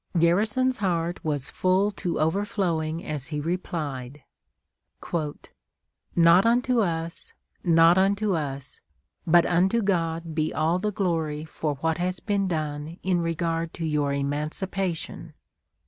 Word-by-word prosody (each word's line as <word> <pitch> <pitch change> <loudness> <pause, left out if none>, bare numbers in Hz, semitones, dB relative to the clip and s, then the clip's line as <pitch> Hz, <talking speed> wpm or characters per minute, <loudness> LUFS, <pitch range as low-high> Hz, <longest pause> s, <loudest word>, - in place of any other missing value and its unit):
Garrison's 215 +10 +2
heart 175 -3 -1
was 145 -4 -2
full 190 +3 +2
to 180 -3 -3
overflowing 165 -2 0
as 145 -3 -3
he 150 -1 -3
replied, 145 -5 -4 1.9
"Not 170 +2 +6
unto 245 +1 +3
us, 165 -4 -2 0.3
not 165 +1 +5
unto 200 +1 +2
us, 140 -4 -4 0.5
but 170 +1 +6
unto 190 +6 +2
God 165 -4 -1
be 155 0 0
all 165 +3 +1
the 210 +2 -1
glory 160 -6 -1
for 155 -2 -3
what 160 0 0
has 180 0 -1
been 200 -2 0
done 155 -1 -3
in 180 -2 +1
regard 165 0 -2
to 165 - -3
your 150 -2 0
emancipation.... 155 +6 -3
170 Hz, 120 wpm, -26 LUFS, 155-190 Hz, 1.9 s, Not